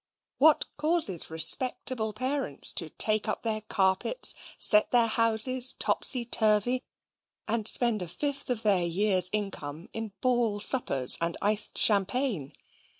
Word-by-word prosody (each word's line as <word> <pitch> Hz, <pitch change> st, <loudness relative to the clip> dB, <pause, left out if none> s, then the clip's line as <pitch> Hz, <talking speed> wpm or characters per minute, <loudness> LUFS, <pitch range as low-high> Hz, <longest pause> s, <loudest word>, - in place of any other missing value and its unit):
What 305 Hz, +2 st, +3 dB
causes 300 Hz, -, 0 dB
respectable 220 Hz, +6 st, +1 dB
parents 255 Hz, -, 0 dB
to 165 Hz, -, -5 dB
take 215 Hz, +6 st, -3 dB
up 215 Hz, -, -5 dB
their 220 Hz, -2 st, -4 dB
carpets, 195 Hz, -, 0 dB, 0.2 s
set 210 Hz, -1 st, +4 dB
their 240 Hz, -2 st, +2 dB
houses 230 Hz, +3 st, +3 dB
topsy 250 Hz, -3 st, +2 dB
turvy, 225 Hz, +2 st, -1 dB, 0.7 s
and 220 Hz, -1 st, -1 dB
spend 235 Hz, -5 st, +2 dB
a 180 Hz, -, -7 dB
fifth 280 Hz, -, -6 dB
of 240 Hz, -3 st, -4 dB
their 195 Hz, -4 st, 0 dB
year's 185 Hz, +1 st, +2 dB
income 175 Hz, -7 st, -7 dB
in 225 Hz, -3 st, -8 dB
ball 240 Hz, -5 st, -2 dB
suppers 170 Hz, -, +2 dB
and 170 Hz, 0 st, -3 dB
iced 210 Hz, +1 st, -1 dB
champagne? 205 Hz, -, -1 dB
215 Hz, 130 wpm, -26 LUFS, 195-250 Hz, 0.7 s, set